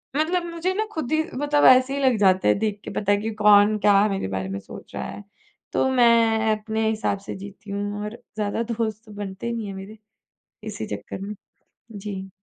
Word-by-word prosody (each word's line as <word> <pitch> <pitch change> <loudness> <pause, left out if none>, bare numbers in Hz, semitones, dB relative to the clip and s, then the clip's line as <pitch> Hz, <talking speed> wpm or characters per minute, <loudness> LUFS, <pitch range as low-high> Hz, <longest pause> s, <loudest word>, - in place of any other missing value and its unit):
मतलब 335 +4 +1
मुझे 350 +3 -1
ना 435 +3 -1
खुद 315 - -4
ही 315 0 +3
मतलब 290 +2 +2
ऐसे 255 +1 +6
ही 280 - -2
लग 255 -3 +4
जाते 190 - +4
हैं 105 - +4
देख 210 -2 -1
के - - -7
पता 205 -1 +1
है 205 - +4
कि 225 - -2
कौन, 210 0 +5
क्या 205 0 +5
मेरे 195 - -2
बारे 95 0 -3
में 100 0 -4
सोच - - -12
रहा - - -3
है, 205 - -8 0.5
तो 265 - +2
मैं 230 -3 +4
अपने 220 +1 -1
हिसाब 215 -2 -1
से - - -5
जीती 200 +1 -10
हूँ 205 +1 -3
और 210 - -5 0.2
ज़्यादा 210 +2 -1
दोस्त 220 -1 -3
तो 215 - -14
बनते 200 +1 -6
ही 235 - -1
नहीं 225 -3 -4
हैं 195 - -6
मेरे 195 +3 -9 0.7
इसी 205 - -5
चक्कर 100 - -8
में। 205 +1 -5 0.6
जी। 195 -2 -6
215 Hz, 210 wpm, -24 LUFS, 200-235 Hz, 0.7 s, ऐसे